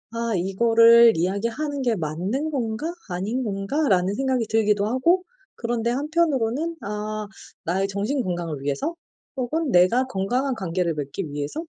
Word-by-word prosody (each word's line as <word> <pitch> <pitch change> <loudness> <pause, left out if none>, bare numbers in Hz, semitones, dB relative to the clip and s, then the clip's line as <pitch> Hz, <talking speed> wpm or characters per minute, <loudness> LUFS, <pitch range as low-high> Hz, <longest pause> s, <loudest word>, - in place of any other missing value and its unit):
'아 230 0 -2
이거를 230 +4 +6
이야기하는 230 - -1
게 240 -3 +2
맞는 190 - -2
건가, 235 -1 -2 0.2
아닌 205 +8 -2
건가.'라는 195 - 0
생각이 260 -1 0
들기도 210 -2 +2
하고 295 +11 +2 0.3
그런데 235 0 -1
한편으로는 300 +1 0
아 210 0 -4 0.4
나의 190 +4 0
정신 205 +8 -1
건강을 175 - -3
위해서 145 - -2 0.4
혹은 275 +4 -1
내가 185 +7 +4
건강한 250 +5 -1
관계를 180 -5 -1
맺기 150 +3 -5
위해서 145 - -4
225 Hz, 315 characters per minute, -24 LUFS, 190-260 Hz, 0.4 s, 이거를